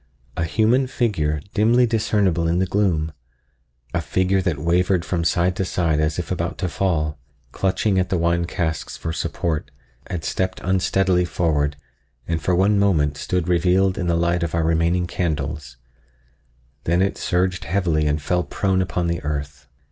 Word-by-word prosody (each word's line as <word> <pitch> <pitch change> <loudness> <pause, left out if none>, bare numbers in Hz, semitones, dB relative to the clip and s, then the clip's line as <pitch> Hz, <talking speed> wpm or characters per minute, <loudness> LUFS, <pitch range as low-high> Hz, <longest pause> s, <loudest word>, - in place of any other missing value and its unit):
—a 80 - -1
human 115 +8 +2
figure, 80 - 0
dimly 115 +4 +4
discernible 105 -7 +1
in 85 +1 +1
the 95 - +2
gloom—a 75 -9 -4
figure 95 +1 +1
that 85 -5 -1
wavered 85 +3 +1
from 85 -2 -1
side 85 +2 +1
to 95 - -1
side 85 -4 0
as 75 0 0
if 90 - -4
about 85 -2 -2
to 95 - -1
fall, 80 -5 -1 0.3
clutching 95 +1 +1
at 90 - 0
the 95 - +1
wine 85 0 +1
casks 85 -2 -3
for 80 - -4
support, 80 -1 -2 0.4
had 90 -4 -4
stepped 95 0 -1
unsteadily 95 0 +2
forward 75 -5 0 0.5
and 80 -2 -1
for 90 +4 +1
one 100 +3 +3
moment 75 -8 +2
stood 90 +3 -2
revealed 90 +2 +3
in 90 - -3
the 85 -1 +2
light 85 +1 +1
of 85 -1 -2
our 85 - +1
remaining 85 +2 +1
candles; 75 -5 -3 1.1
then 85 +3 +2
it 100 - 0
surged 90 0 -1
heavily 85 -4 +1
and 75 0 -1
fell 90 +3 +1
prone 95 0 0
upon 90 -1 -1
the 85 0 -1
earth. 70 -2 -5
85 Hz, 165 wpm, -22 LUFS, 80-95 Hz, 1.1 s, dimly